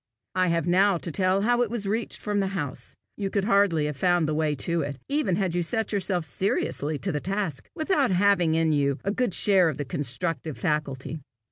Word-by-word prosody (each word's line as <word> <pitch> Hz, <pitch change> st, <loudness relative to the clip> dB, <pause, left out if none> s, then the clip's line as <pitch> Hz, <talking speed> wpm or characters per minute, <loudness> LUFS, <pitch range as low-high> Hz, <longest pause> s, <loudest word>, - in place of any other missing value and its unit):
I 185 Hz, 0 st, +2 dB
have 165 Hz, -2 st, +1 dB
now 190 Hz, +2 st, +4 dB
to 170 Hz, -, -5 dB
tell 185 Hz, +3 st, +1 dB
how 240 Hz, +2 st, +3 dB
it 240 Hz, -, +1 dB
was 230 Hz, -3 st, -3 dB
reached 220 Hz, +3 st, -2 dB
from 205 Hz, -1 st, 0 dB
the 195 Hz, -, +1 dB
house. 130 Hz, -5 st, -5 dB, 0.2 s
You 200 Hz, -2 st, -2 dB
could 200 Hz, 0 st, 0 dB
hardly 200 Hz, -7 st, +3 dB
have 150 Hz, -1 st, -2 dB
found 175 Hz, +2 st, +2 dB
the 155 Hz, -, 0 dB
way 155 Hz, -1 st, 0 dB
to 170 Hz, +4 st, -1 dB
it, 140 Hz, -2 st, -4 dB
even 275 Hz, -, +1 dB
had 190 Hz, -3 st, -1 dB
you 175 Hz, -, +1 dB
set 225 Hz, +6 st, -1 dB
yourself 185 Hz, -4 st, 0 dB
seriously 155 Hz, -3 st, -1 dB
to 190 Hz, +6 st, -2 dB
the 150 Hz, -, -1 dB
task, 195 Hz, -5 st, -3 dB
without 310 Hz, -4 st, +1 dB
having 180 Hz, -3 st, +3 dB
in 160 Hz, -1 st, +2 dB
you 140 Hz, -2 st, +1 dB
a 200 Hz, -, 0 dB
good 240 Hz, -3 st, 0 dB
share 190 Hz, -5 st, +4 dB
of 145 Hz, -, -4 dB
the 145 Hz, -, -3 dB
constructive 145 Hz, +3 st, -3 dB
faculty. 150 Hz, -2 st, -2 dB
180 Hz, 215 wpm, -26 LUFS, 155-200 Hz, 0.2 s, now